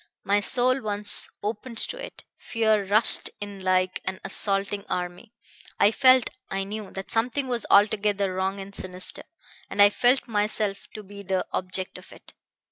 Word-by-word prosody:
My 200 Hz, +1 st, +2 dB
soul 255 Hz, +5 st, +2 dB
once 210 Hz, -1 st, +3 dB
opened 225 Hz, +3 st, -5 dB
to -, -, 0 dB
it, -, -, -10 dB, 0.2 s
fear 220 Hz, -3 st, +1 dB
rushed 210 Hz, +4 st, +3 dB
in 205 Hz, -1 st, -7 dB
like 185 Hz, 0 st, +1 dB
an 190 Hz, 0 st, -4 dB
assaulting 200 Hz, 0 st, -1 dB
army. 180 Hz, +5 st, -5 dB, 0.5 s
I 205 Hz, -, +5 dB
felt 255 Hz, +1 st, +4 dB, 0.2 s
I 195 Hz, 0 st, -2 dB
knew 210 Hz, +1 st, -7 dB
that 195 Hz, 0 st, -7 dB
something 245 Hz, +4 st, 0 dB
was 240 Hz, -3 st, -2 dB
altogether 205 Hz, -1 st, +3 dB
wrong 190 Hz, +1 st, -2 dB
and 195 Hz, +1 st, -9 dB
sinister, 185 Hz, -1 st, -6 dB, 0.5 s
and 200 Hz, -, -7 dB
I 205 Hz, 0 st, +7 dB
felt 250 Hz, +5 st, +2 dB
myself 210 Hz, -2 st, -1 dB
to 215 Hz, -, -7 dB
be 200 Hz, +1 st, -11 dB
the 190 Hz, -1 st, -2 dB
object 185 Hz, 0 st, -3 dB
of -, -, -17 dB
it. -, -, -13 dB
205 Hz, 160 wpm, -25 LUFS, 195-220 Hz, 0.5 s, I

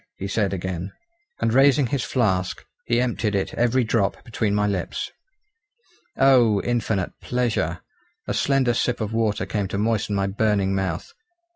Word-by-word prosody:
he 95 Hz, -, -4 dB
said 100 Hz, 0 st, 0 dB
again. 95 Hz, 0 st, -4 dB, 0.5 s
And 115 Hz, -, +1 dB
raising 135 Hz, +1 st, +5 dB
his 130 Hz, +2 st, -1 dB
flask 95 Hz, -8 st, 0 dB, 0.2 s
he 120 Hz, 0 st, +2 dB
emptied 115 Hz, -4 st, 0 dB
it 95 Hz, -, -1 dB
every 120 Hz, +2 st, +2 dB
drop 110 Hz, -3 st, 0 dB
between 110 Hz, -4 st, -1 dB
my 105 Hz, 0 st, +2 dB
lips. 100 Hz, -4 st, -2 dB, 1.1 s
Oh! 125 Hz, -6 st, +5 dB
infinite 110 Hz, -6 st, -1 dB
pleasure! 110 Hz, -9 st, -1 dB, 0.5 s
a -, -, -1 dB
slender 135 Hz, -3 st, +2 dB
sip 125 Hz, +1 st, 0 dB
of 110 Hz, -1 st, -3 dB
water 110 Hz, -2 st, 0 dB
came 100 Hz, -3 st, -2 dB
to 100 Hz, -, -4 dB
moisten 105 Hz, -1 st, 0 dB
my 100 Hz, 0 st, +1 dB
burning 100 Hz, -1 st, +1 dB
mouth. 95 Hz, -4 st, -3 dB
110 Hz, 150 wpm, -23 LUFS, 100-120 Hz, 1.1 s, raising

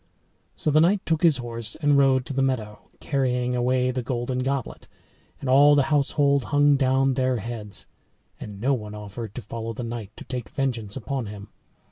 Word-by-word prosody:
So 155 Hz, -, 0 dB
the 155 Hz, +2 st, +5 dB
knight 185 Hz, +4 st, +2 dB
took 160 Hz, -2 st, 0 dB
his 165 Hz, -5 st, +5 dB
horse 115 Hz, -3 st, -4 dB
and 145 Hz, -2 st, +2 dB
rode 135 Hz, -2 st, +4 dB
to -, -, -5 dB
the 135 Hz, -, 0 dB
meadow, 115 Hz, -6 st, -2 dB
carrying 125 Hz, -3 st, 0 dB
away 125 Hz, +1 st, +1 dB
the 125 Hz, 0 st, -2 dB
golden 125 Hz, +1 st, -2 dB
goblet. 135 Hz, 0 st, -3 dB, 0.5 s
And 140 Hz, -, -6 dB
all 145 Hz, +3 st, +6 dB
the 145 Hz, +2 st, +2 dB
household 140 Hz, -2 st, +2 dB
hung 145 Hz, +3 st, +4 dB
down 135 Hz, 0 st, +2 dB
their 130 Hz, -1 st, +1 dB
heads 110 Hz, -3 st, -4 dB, 0.5 s
and 105 Hz, -2 st, -8 dB
no 130 Hz, +6 st, +2 dB
one 105 Hz, -4 st, -5 dB
offered 105 Hz, +1 st, -7 dB
to 125 Hz, -, -6 dB
follow 115 Hz, +2 st, -5 dB
the 120 Hz, -, -6 dB
knight 115 Hz, -3 st, -5 dB
to -, -, -8 dB
take 125 Hz, -3 st, -5 dB
vengeance 120 Hz, -7 st, -2 dB
upon 130 Hz, -1 st, -3 dB
him. 100 Hz, 0 st, -9 dB
130 Hz, 185 wpm, -25 LUFS, 115-140 Hz, 0.5 s, all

